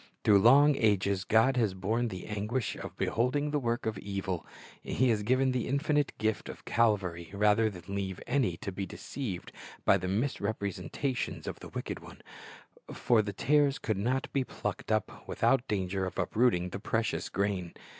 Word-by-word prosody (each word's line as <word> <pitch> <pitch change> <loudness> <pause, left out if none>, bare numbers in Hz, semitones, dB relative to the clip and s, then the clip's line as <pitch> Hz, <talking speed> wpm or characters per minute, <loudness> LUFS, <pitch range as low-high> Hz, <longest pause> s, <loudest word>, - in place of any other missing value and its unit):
Through 100 -2 +6
long 140 +7 +6
ages 100 -3 +2
God 115 +6 +3
has 110 -6 +1
borne 110 +6 0
the 95 -5 -6
anguish 105 +4 -2
of - - -8
beholding 145 +5 0
the 145 - +1
work 120 -2 -1
of 110 -2 -2
evil, 95 -4 -4 0.3
He 130 +1 +1
has 110 -3 +2
given 130 +4 +2
the 125 -2 -1
infinite 145 +1 +1
Gift 110 0 -1
of - - -9
Calvary, 95 -7 +1
rather 105 +2 +3
than 90 -1 -9
leave 95 -2 -3
any 120 -9 +1
to 100 - -2
be 95 +1 -4
deceived 105 -2 -6 0.3
by - - +6
the 95 - -4
misrepresenta 100 - -2
tions - - -4
of - - -5
the - - -9
wicked - - -5
one; - - -13 0.7
for 115 -3 +3
the 105 -1 -4
tares 145 +6 +2
could 110 -3 -2
not 125 +6 0
be 135 - +2
plucked - - -5
up - - -2
without 135 -2 +2
danger 95 -1 -1
of - - -7
uprooting 105 -7 +2
the 95 - -6
precious 110 +3 -1
grain. 95 -3 -1
110 Hz, 175 wpm, -30 LUFS, 95-125 Hz, 0.7 s, Through